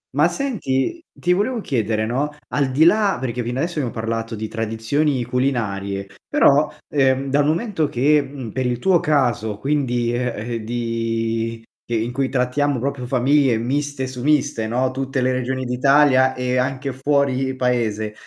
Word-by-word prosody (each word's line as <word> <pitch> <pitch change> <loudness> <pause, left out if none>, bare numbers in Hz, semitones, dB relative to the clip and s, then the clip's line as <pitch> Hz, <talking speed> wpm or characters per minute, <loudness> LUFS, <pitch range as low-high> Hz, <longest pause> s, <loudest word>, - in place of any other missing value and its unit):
Ma - - +5
senti, 255 - -2
ti 180 +1 0
volevo 225 +6 0
chiedere, 110 - -1
no, 135 +6 -1 0.2
al 140 -2 0
di 140 +5 +3
là 205 0 +4
perché 125 -1 -3
fino 120 +2 -3
adesso 165 +2 -1
abbiamo 125 -4 -1
parlato 115 0 -3
di 110 +1 -4
tradizioni 115 +5 -1
culinarie, 105 -6 -1 0.2
però, 150 +2 +4 0.2
ehm, 135 -1 +1
dal 145 +1 +3
momento 165 -1 0
che, 145 +4 +3
mhmm, 130 -6 -7
per 130 -1 -1
il 120 -1 -1
tuo 180 +5 +3
caso 120 -8 +1
quindi 125 -3 0
eh, 120 -1 -3
eh, 110 - -7
di 115 -1 -2 0.2
in 115 +1 -1
cui 135 0 0
trattiamo 135 +1 0
proprio 135 -1 -3
famiglie 130 -1 +3
miste 140 +3 -2
su 130 -1 -7
miste, 135 -7 +1
no, 130 +3 0
tutte 135 0 -2
le 130 +1 +2
regioni 130 +1 -2
d'Italia 130 +1 +4
e 125 0 -1
anche 135 +1 -1
fuori 135 -1 0
paese, 110 -4 -1
130 Hz, 160 wpm, -21 LUFS, 115-140 Hz, 0.2 s, Ma